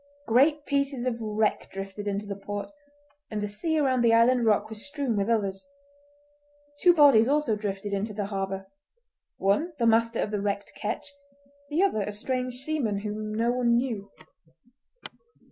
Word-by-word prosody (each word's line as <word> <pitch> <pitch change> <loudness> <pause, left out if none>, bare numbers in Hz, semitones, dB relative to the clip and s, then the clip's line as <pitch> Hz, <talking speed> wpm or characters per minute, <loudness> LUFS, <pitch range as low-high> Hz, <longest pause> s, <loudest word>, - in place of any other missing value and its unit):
Great 285 +6 +3
pieces 280 -3 0
of 235 -2 -2
wreck 215 0 0
drifted 195 +1 -6
into 200 +1 -2
the 200 -1 -5
port, 205 +2 -6 0.6
and 215 - -3
the 210 - -2
sea 315 +11 -1
around 260 -4 +2
the 230 -1 +5
island 235 0 +4
rock 215 0 +3
was 220 -1 -8
strewn 285 -5 -2
with 200 +1 0
others. 200 +1 -1 1.1
Two 360 - +6
bodies 280 -8 +6
also 290 -6 +2
drifted 205 -1 -4
into 200 +2 -1
the 205 -1 -3
harbour—one 195 - -4
the 235 - +1
master 230 0 +3
of 210 - -1
the 205 -2 -1
wrecked 200 0 -3
ketch, 225 +7 -4 0.6
the 315 +5 +2
other 375 - +1
a 205 - -3
strange 250 +4 -3
seaman 255 -7 -1
whom 215 0 -4
no 230 +2 +1
one 245 -1 +2
knew. 230 -5 -2
220 Hz, 160 wpm, -27 LUFS, 205-260 Hz, 1.1 s, Two